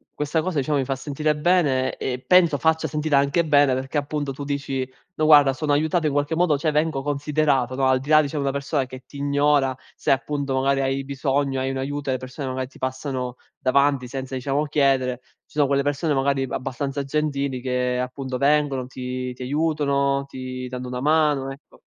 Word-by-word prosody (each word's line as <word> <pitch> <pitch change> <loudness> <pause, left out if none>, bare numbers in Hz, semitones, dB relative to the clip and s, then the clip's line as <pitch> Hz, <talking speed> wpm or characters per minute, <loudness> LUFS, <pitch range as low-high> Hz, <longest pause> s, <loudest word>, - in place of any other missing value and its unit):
questa 150 +2 0
cosa, 180 -3 -3
diciamo, 140 +1 +1
mi - - +1
fa 135 - -1
sentire 150 +2 -1
bene 150 -6 +2
e 125 -1 -2
penso 175 -5 +5
faccia 160 +1 +1
sentire 150 -1 0
anche 140 +4 +3
bene 145 -3 +4
perché, 135 +3 -2
appunto, 145 -1 -3
tu 145 - -7
dici: 140 -2 -2 0.3
“No, 155 - 0
guarda, 145 -3 +7
sono 145 +2 -1
aiutato 155 +2 +1
in - - 0
qualche 145 +2 0
modo 165 -4 +3
cioè 155 +2 0
vengo 150 -2 0
considerato”, 145 -3 0
no, 135 0 +1
al 130 0 +3
di 140 +3 -9
là 155 0 +7
dicia 150 +1 -4
di - - 0
una 135 -1 0
persona 140 -1 -1
che 130 0 -10
ti 140 - -12
ignora, 140 -2 +2 0.2
se, - - -4
appunto, 140 0 0
magari, 135 +1 +2
hai 135 0 -1
bisogno, 135 0 -1
hai 130 +1 -1
un 135 - -3
aiuto 145 +1 -3
e - - +2
le - - 0
persone, 130 +2 -7
magari, 130 0 -3
ti 135 - -18
passano 130 -1 -3 0.2
davanti 140 -1 +2
senza, 130 0 -6
diciamo, 140 +3 -1
chiedere, 135 -3 +1 0.3
ci - - -25
sono 145 -2 +2
quelle 140 0 +1
persone, 145 +1 0
magari, 135 0 +1
abbastanza 135 +3 -3
gentili 140 -2 -1
che, 125 -1 -1
appunto, 130 0 -4
vengono, 140 -3 +2
ti 125 -1 -5
ti 125 - -7
aiutano, 140 -1 0
ti 130 -1 -6
danno 125 0 -6
una 125 0 -4
mano, 150 -3 +2
ecco. 140 - -15
140 Hz, 200 wpm, -23 LUFS, 130-150 Hz, 0.3 s, guarda